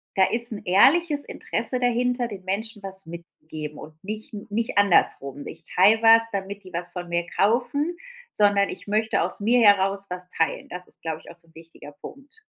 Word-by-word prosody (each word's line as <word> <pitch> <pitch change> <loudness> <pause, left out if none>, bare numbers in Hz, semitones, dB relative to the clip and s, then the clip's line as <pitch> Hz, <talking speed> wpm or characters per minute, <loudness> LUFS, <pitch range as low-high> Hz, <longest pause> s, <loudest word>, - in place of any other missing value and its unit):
da 190 - +4
ist 235 0 +2
'n 205 - -7
ehrliches 285 - +4
Interesse 255 - -3
dahinter, 245 0 0
den 195 -4 -9
Menschen 210 +2 -4
was 190 -2 -2
mitzugeben 155 -3 -9
und 155 - -11
nicht 215 +2 -7 0.2
nicht 225 -1 0
andersrum: 145 -7 +2
„Ich 165 - -9
teile 205 +6 +3
was, 225 0 +7
damit 200 +1 -5
die 185 -1 -14
was 175 +1 -3
von 175 -1 -6
mir 170 0 -1
kaufen, 255 - +1 0.4
sondern 200 -1 +3
ich - - -9
möchte 215 +2 +1
aus - - -1
mir 235 +4 +3
heraus 200 -1 +3
was 180 0 -6
teilen.” 165 - -1
Das 180 0 -6
ist, - - -8
glaube 160 -1 -4
ich, - - -14
auch - - -12
so 170 -1 -10
'n 165 - -26
wichtiger 165 -2 -13
Punkt. 280 - -12
200 Hz, 190 wpm, -24 LUFS, 175-230 Hz, 0.4 s, was